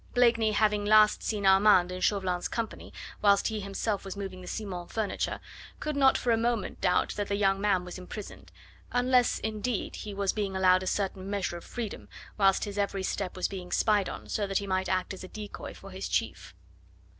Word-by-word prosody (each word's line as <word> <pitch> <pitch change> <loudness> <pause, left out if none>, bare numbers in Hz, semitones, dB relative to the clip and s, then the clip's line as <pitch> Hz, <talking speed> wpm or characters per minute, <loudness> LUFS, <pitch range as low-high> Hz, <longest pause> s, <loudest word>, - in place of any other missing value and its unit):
Blakeney 230 -3 +4
having 210 -1 +2
last 215 0 +5
seen 210 -2 -2
Armand 190 -2 +6
in 185 0 -5
Chauvelin's 185 -3 0
company, 230 -2 -5 0.3
whilst 200 0 +4
he 220 -1 -3
himself 200 +1 -2
was 195 0 -7
moving 190 -2 -6
the 180 - -10
Simons' 180 -4 -5
furniture, 215 -4 -2 0.4
could 305 -1 -3
not 270 -1 +5
for 245 - 0
a 225 - +4
moment 230 -2 -1
doubt 180 -1 +2
that 205 -1 -3
the 200 - 0
young 195 -1 +2
man 195 -3 +2
was 180 +1 -7
imprisoned, 195 +3 -9 0.4
unless, 245 0 +3
indeed, 220 +1 -3
he 210 - -6
was 200 -1 0
being 200 -3 -2
allowed 185 -1 +4
a 185 - -5
certain 195 -1 -2
measure 200 -3 -2
of 170 - -11
freedom, 230 -4 -6 0.3
whilst 195 -2 +3
his 205 -1 -4
every 200 -1 -1
step 190 0 -2
was 185 - 0
being 185 -2 -7
spied 210 -3 +2
on, - - -8
so 205 -2 -1
that 195 - 0
he 200 - -2
might 190 -1 -1
act 185 0 0
as 190 - -9
a - - -7
decoy 210 +1 -7
for - - -12
his - - -5
chief. - - -2
200 Hz, 200 wpm, -29 LUFS, 190-215 Hz, 0.4 s, Armand